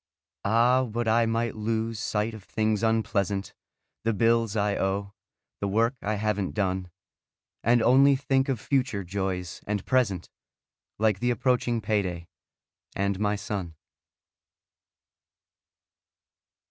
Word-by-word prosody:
Ah, 120 +5 +4
would 120 -1 -2
I 115 +1 +3
might 115 0 0
lose 110 0 -2
sight 105 +2 -1
of 110 -3 -10
things 110 0 0
unpleasant: 105 -3 0 0.5
The 115 0 +1
bills 115 0 +2
I 100 -1 +1
owe; 100 +1 -1 0.5
the 100 - -1
work 115 +5 +2
I 105 +1 -1
haven't 105 -2 -1
done. 95 -3 -1 0.7
And 120 0 +4
only 135 +3 +6
think 135 0 +1
of 130 -4 0
future 125 -6 0
joys 95 -1 -3
and 105 -2 -2
present, 110 -9 +1 0.7
Like 105 -2 +2
the 120 - +1
approaching 120 -1 +1
payday, 95 -5 -1 0.7
and 100 -1 0
my 105 0 +1
son. 100 -5 -5
110 Hz, 120 wpm, -27 LUFS, 100-115 Hz, 0.7 s, only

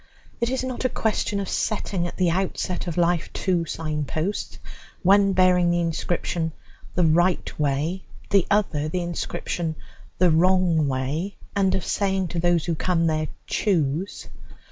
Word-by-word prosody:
It 235 0 +1
is 260 0 -1
not 255 -1 -4
a 255 - +2
question 215 -3 -1
of 195 - -3
setting 195 -5 -1
at - - -8
the 180 -2 +2
outset 185 0 -2
of 170 - -3
life 175 -1 +1
two 180 -3 0
sign 155 -2 -3
posts, 160 +8 -3 0.5
one 195 +1 +5
bearing 180 -1 +4
the 175 0 +2
inscription 165 0 -1 0.4
"The 180 - +3
Right 175 +2 +2
Way," 150 +6 -1 0.3
the 195 -3 +4
other 170 -8 +1
the 180 +2 -2
inscription 170 -1 -3 0.4
"The 180 -1 +4
Wrong 170 -2 +3
Way," 140 +9 -2 0.2
and 190 -2 +2
of 190 - -2
saying 190 -3 0
to 170 - -2
those 175 -1 +2
who 170 - 0
come 165 +1 +1
there, 155 -1 +1 0.2
"Choose." 170 -2 -1
175 Hz, 155 wpm, -24 LUFS, 160-190 Hz, 0.5 s, one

